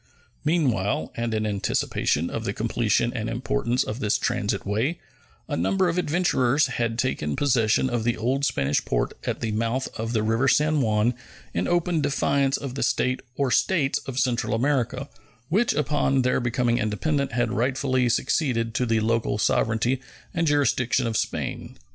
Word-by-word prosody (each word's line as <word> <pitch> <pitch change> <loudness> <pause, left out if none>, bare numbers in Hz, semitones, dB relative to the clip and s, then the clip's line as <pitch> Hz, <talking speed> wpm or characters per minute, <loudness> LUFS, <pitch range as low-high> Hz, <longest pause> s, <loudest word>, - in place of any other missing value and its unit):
Meanwhile, 130 - 0
and 115 0 -2
in 110 0 -1
anticipation 95 -5 0
of 115 - -3
the 100 - -2
completion 115 +1 0
and 110 -2 -3
importance 125 +1 0
of 110 +3 -5
this 105 -5 +1
transit - - -1
way, 115 - -1 0.5
a - - -2
number 180 - +1
of 170 +2 0
adventurers 145 -5 +2
had 120 -3 -2
taken 120 - -1
possession 120 -3 +2
of 120 -3 -1
the 120 0 0
old 130 +5 0
Spanish 70 - +1
port - - -1
at - - -2
the 115 - -1
mouth 115 +4 -1
of 115 +1 -2
the 110 -2 +1
river 115 +4 +1
San 150 +1 +3
Juan 110 0 +2 0.4
in - - -1
open 175 -2 +1
defiance 140 -1 +1
of 135 -3 -6
the 135 - -4
State 130 0 +1 0.2
or 135 -2 0
States 155 -6 +2
of 130 -2 -5
Central 125 -4 +1
America, 130 +1 0 0.4
which 210 +8 +2
upon 145 -2 +1
their 125 0 +2
becoming 120 -1 0
independent 140 +6 -1
had 120 -1 0
rightfully 130 +1 +1
succeeded 120 -2 0
to 125 +1 0
the 115 -1 +2
local 115 -1 0
sovereignty 115 +4 +1 0.3
and 165 -2 0
jurisdiction 135 -4 +2
of 115 -1 -2
Spain. - - -3
125 Hz, 165 wpm, -25 LUFS, 115-140 Hz, 0.5 s, San